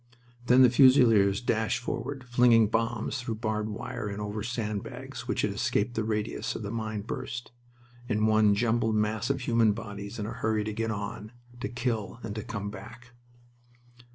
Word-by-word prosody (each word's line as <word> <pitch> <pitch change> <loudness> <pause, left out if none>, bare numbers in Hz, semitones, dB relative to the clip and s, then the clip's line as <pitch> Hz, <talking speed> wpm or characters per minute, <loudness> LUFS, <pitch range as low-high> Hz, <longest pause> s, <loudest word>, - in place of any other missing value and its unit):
Then 125 +1 +7
the 125 - +7
Fusiliers 115 -6 +5
dashed 110 -2 0
forward, 135 +2 -4
flinging 120 -3 +4
bombs 115 +3 -1
through 120 -2 -3
barbed 110 -1 -2
wire 105 -1 -5
and 100 0 -5
over 105 +1 -4
sand 110 -3 -2
bags - - -8
which - - -1
had - - +1
escaped 115 +4 0
the 110 -2 -1
radius 110 +1 -2
of - - -5
the 100 - -4
mine 110 -2 -3
burst 120 +2 -5 0.6
in 105 -1 +2
one 110 -1 +4
jumbled 110 0 +1
mass 110 +2 0
of 140 -1 0
human 115 -3 +3
bodies 100 -1 -7
in 105 - -3
a 110 - -4
hurry 110 -2 0
to 110 0 -4
get 115 +1 -2
on, 105 +1 -5 0.3
to 130 - -3
kill, 120 -4 -2
and 110 -2 -4
to 110 - -4
come 100 -1 -5
back. 120 +3 -11
110 Hz, 180 wpm, -28 LUFS, 105-120 Hz, 0.6 s, Then